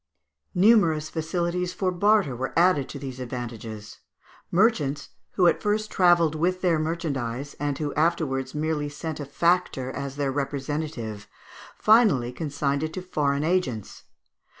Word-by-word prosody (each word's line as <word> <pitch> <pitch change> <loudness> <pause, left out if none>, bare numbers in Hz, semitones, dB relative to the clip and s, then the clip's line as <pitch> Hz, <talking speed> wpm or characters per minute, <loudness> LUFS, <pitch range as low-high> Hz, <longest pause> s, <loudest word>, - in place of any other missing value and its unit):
Numerous 180 -6 +4
facilities 175 +2 -2
for 185 0 -1
barter 200 - +2
were 130 +5 -4
added 170 -6 +3
to - - -6
these 130 -2 -7
advantages. 115 -4 -7 0.5
Merchants, 170 - +1 0.2
who 185 - +3
at 170 - +3
first 215 0 -1
travelled 175 -4 +4
with 180 +4 0
their 170 -4 +2
merchandise, 140 -5 -3
and 145 -1 -1
who 150 -2 -3
afterwards 150 -5 0
merely 150 -1 -1
sent 155 +2 -6
a 145 - -4
factor 170 -4 +1
as 140 0 -5
their 140 -1 -1
representative, 135 -6 -4 0.5
finally 210 - +4
consigned 140 0 -2
it 155 0 -3
to 185 - -4
foreign 145 -5 0
agents. 155 - -2
150 Hz, 135 wpm, -25 LUFS, 135-175 Hz, 0.5 s, Numerous